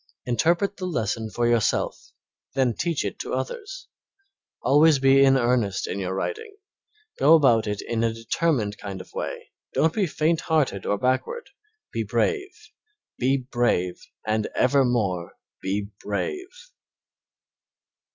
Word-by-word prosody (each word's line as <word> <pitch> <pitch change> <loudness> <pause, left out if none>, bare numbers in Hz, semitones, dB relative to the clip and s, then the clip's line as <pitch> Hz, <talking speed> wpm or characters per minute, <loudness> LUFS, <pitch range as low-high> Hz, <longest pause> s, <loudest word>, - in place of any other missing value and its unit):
Interpret 170 - +1
the 185 - -4
lesson 110 - -2
for 120 +2 -1
yourself, 120 -3 0 0.5
then 130 -3 +2
teach 165 +4 -1
it - - -4
to - - -3
others. - - -5 0.8
Always 150 +3 +5
be 135 0 +5
in 135 0 +5
earnest 120 -6 +1
in 100 - -4
your 95 0 -2
writing; 430 - -4 0.6
go 155 +4 +7
about 120 -8 +4
it 105 0 -3
in 115 -1 -1
a 115 - +2
determined 115 -1 -1
kind 100 -2 -6
of - - -12
way, - - -5 0.2
don't 160 0 +3
be 200 -4 +1
faint 160 +2 +1
hearted 145 - 0
or 100 - +1
backward, 130 - -1 0.4
be - - -1
brave, 385 -5 -2 0.5
be 130 +2 +2
brave, 120 -9 0 0.2
and 110 0 0
evermore 120 -10 +1 0.3
be 100 +1 -2
brave. 365 - -3
130 Hz, 130 wpm, -25 LUFS, 110-165 Hz, 0.8 s, go